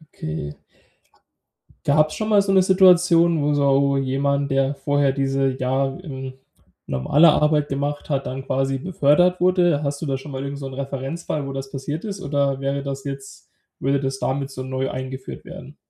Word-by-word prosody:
Okay. 75 -1 -5 1.3
Gab's 155 +2 +3
schon 215 0 -3
mal 205 -2 +5
so 195 -1 0
'ne 190 - +5
Situation, 180 -3 +5
wo 145 +1 +1
so 140 -1 +3
wo 140 0 +2
jemand, 140 +1 0
der 135 +1 +1
vorher 140 0 +1
diese, 135 0 0
ja, 130 +2 +1
ähm, 135 -6 -7 0.5
normale 140 - +4
Arbeit 150 -1 +2
gemacht 145 +2 -3
hat, 135 -1 -1
dann 130 +1 -5
quasi 135 0 0
befördert 175 +3 +2
wurde. 175 -5 +3
Hast 140 0 -3
du 160 - -3
da 135 -2 -1
schon 140 +2 -10
mal 130 - -4
irgend 140 0 -5
so 135 - -6
'nen 135 +1 -8
Referenzfall, 140 +2 -4
wo 135 - -5
das 135 0 -6
passiert 145 +6 -5
ist, 195 -2 -5
oder 140 -3 0
wäre 140 0 -2
das 135 -1 -5
jetzt 135 -1 -8 0.3
würde 140 +1 +1
das 135 0 -2
damit 135 +1 -2
so 130 -1 -7
neu 130 0 -2
eingeführt 130 +1 -7
werden? - - -11
140 Hz, 180 wpm, -22 LUFS, 135-150 Hz, 1.3 s, mal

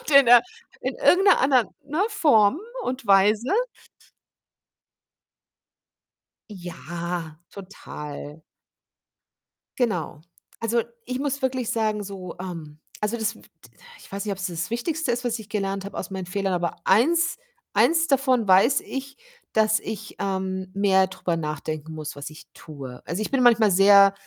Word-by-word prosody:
und - - -7
in 275 -3 +7
'ner 245 0 +9 0.4
in - - -3
irgend 390 -6 +4
'ner 390 - +6
anderen, 260 -3 +3 0.2
ne, 300 +6 -1
Form 285 - +3 0.3
und 255 -1 -4
Weise. 210 - +4 3.0
Ja, 170 -3 -6
total. 150 -6 -9 1.4
Genau. 185 - -1 0.4
Also, 230 +1 +1 0.2
ich 255 +1 -3
muss 280 0 -2
wirklich 255 -2 -1
sagen, 215 -3 0
so, 190 -3 -8
ähm 165 -5 -7 0.2
also, 210 +2 0
das 220 0 -1
w - - -17
t - - -21 0.5
ich - - -17
weiß 200 +2 -4
nicht, 205 - -1
ob's 190 -1 -3
das 175 +1 -4
Wichtigste 300 +5 -2
ist, 240 +1 -1
was 235 -1 -1
ich 215 -2 -11
gelernt 195 -2 -2
habe - - -9
aus 190 - -5
meinen 190 -2 -5
Fehlern, 195 +1 -2
aber 175 -1 -1
1, 320 - +3 0.3
1 325 0 +3
davon 260 -4 +2
weiß 195 +9 +5
ich, 275 +1 -7 0.4
dass 220 0 +3
ich, 215 0 -7
ähm, 190 -1 -3
mehr 195 -1 +3
drüber 180 -2 -3
nachdenken 155 0 -5
muss, 155 -1 -6
was 145 0 -7
ich 155 - -14
tue. 135 -5 -10
Also, 175 +7 -3
ich - - -4
bin 270 -2 +2
manchmal 230 -3 +5
sehr 195 +1 +7
200 Hz, 150 wpm, -24 LUFS, 180-245 Hz, 3.0 s, ner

